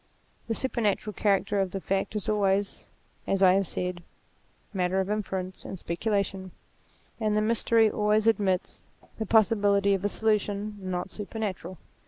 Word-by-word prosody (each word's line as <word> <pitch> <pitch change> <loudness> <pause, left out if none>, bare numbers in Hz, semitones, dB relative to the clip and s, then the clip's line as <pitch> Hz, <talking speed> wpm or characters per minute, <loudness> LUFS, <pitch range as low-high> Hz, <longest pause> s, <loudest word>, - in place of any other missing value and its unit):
The 225 - -1
supernatural 215 -5 -1
character 200 0 +1
of 195 -1 +1
the 195 - -4
fact 195 +3 -2
is 210 - -3
always, 200 -1 0 0.4
as 195 0 +1
I 185 -1 +7
have 195 -1 +1
said, 180 -1 -3 0.7
matter 185 0 0
of 190 +2 -1
inference 190 -3 -3
and 190 - -7
speculation: 195 +2 -2 0.7
and 215 -2 +1
the - - +4
mystery 225 0 +3
always 210 0 +1
admits 200 -5 +1 0.4
the 220 - -2
possibility 205 -2 +4
of 195 -1 -1
a 205 - +1
solution 210 -1 -1
not 185 0 -3
supernatural. 200 -4 -5
200 Hz, 145 wpm, -27 LUFS, 190-215 Hz, 0.7 s, I